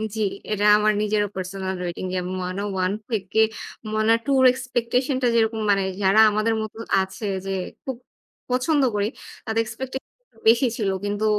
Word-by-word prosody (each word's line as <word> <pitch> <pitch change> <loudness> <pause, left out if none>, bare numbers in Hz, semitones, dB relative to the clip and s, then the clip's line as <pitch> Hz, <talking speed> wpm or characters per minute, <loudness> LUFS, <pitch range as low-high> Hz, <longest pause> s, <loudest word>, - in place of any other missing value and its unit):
জি, 220 - -2 0.3
এটা 205 0 +1
আমার 215 0 +3
নিজেরও 210 -1 +1
personal 190 0 -4
rating 175 +1 -4
যে - - +1
'Moana 185 +1 -3 0.3
I' 200 - -1 0.2
থেকে 210 0 -1 0.5
'Moana 215 +1 +3
II' 275 - +3
এর 255 - +9
expectation 255 +1 -1
টা 250 - +3
যেরকম 225 -1 +2
মানে 195 -1 +2 0.2
যারা 195 +3 +4
আমাদের 215 +2 +1
মতো 215 0 -6 0.2
আছে 190 +4 -5 0.2
যে 195 - -3 0.3
খুব 260 -3 -4 0.5
পছন্দ 270 +4 +2
করি 205 0 +1 0.4
তাদের 225 0 +1
expectation 260 +3 -6 0.4
বেশি 235 +3 +5
ছিল। 205 -4 0 0.2
কিন্তু 205 +1 -1
215 Hz, 160 wpm, -23 LUFS, 195-235 Hz, 0.5 s, এর